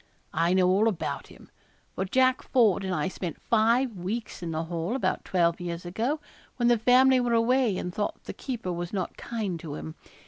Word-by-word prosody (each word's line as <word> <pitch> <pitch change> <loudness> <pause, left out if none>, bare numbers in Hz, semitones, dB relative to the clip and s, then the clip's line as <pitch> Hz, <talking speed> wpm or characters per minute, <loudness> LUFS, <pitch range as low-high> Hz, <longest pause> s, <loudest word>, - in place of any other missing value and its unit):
I 170 +2 +2
know 185 -1 +4
all 195 +4 +4
about 205 -7 -2
him; - - -16 0.4
for 190 - -2
Jack 255 +5 +3
Ford 220 -7 +3
and 190 - -2
I 185 - 0
spent 180 -3 -5
five 230 +2 +2
weeks 205 +5 -4
in 170 - -4
the 160 0 -2
Hall, 170 +6 -3
about 265 - -1
twelve 170 -1 +1
years 170 0 -5
ago, 230 - -1 0.4
when 240 -1 +2
the 240 -2 +4
family 255 +3 +5
were 245 -1 +1
away 230 -3 +2
and 180 - -4
thought 205 - -3
the - - -6
keeper 230 -9 -4
was 175 0 -4
not 185 -4 -3
kind 210 -7 -4
to 155 -3 -6
him. 155 - -7
200 Hz, 200 wpm, -27 LUFS, 175-240 Hz, 0.4 s, family